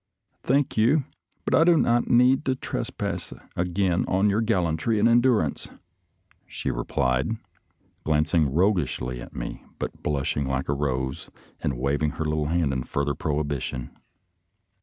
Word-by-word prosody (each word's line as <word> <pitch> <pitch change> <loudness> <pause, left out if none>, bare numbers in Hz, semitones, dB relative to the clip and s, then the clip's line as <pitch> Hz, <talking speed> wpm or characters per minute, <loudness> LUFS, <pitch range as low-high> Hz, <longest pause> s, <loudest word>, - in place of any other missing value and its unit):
" - - -50
Thank 140 +1 +1
you, 130 +7 +4 0.4
but - - -1
I 160 - +6
do 170 0 +5
not 120 -4 +2
need 125 +3 +5
to 130 - +1
trespass - - -4 0.2
again 90 0 +1
on 100 +2 +2
your 105 +3 +1
gallantry 95 -2 +1
and 105 +2 +4
endurance," 120 - +2 0.8
she - - -3
replied, 65 - 0 0.7
glancing 75 -1 +2
roguishly 75 - 0
at - - -11
me, - - -5
but - - -5
blushing 70 -1 -1
like 65 0 -2
a - - +3
rose 65 -2 -2 0.3
and 65 - -2
waving 70 +3 0
her 80 - -2
little 75 -1 0
hand 80 -3 +1
in 65 - -1
further 70 +3 -1
prohibition. 70 -4 -3
80 Hz, 140 wpm, -25 LUFS, 70-110 Hz, 0.8 s, I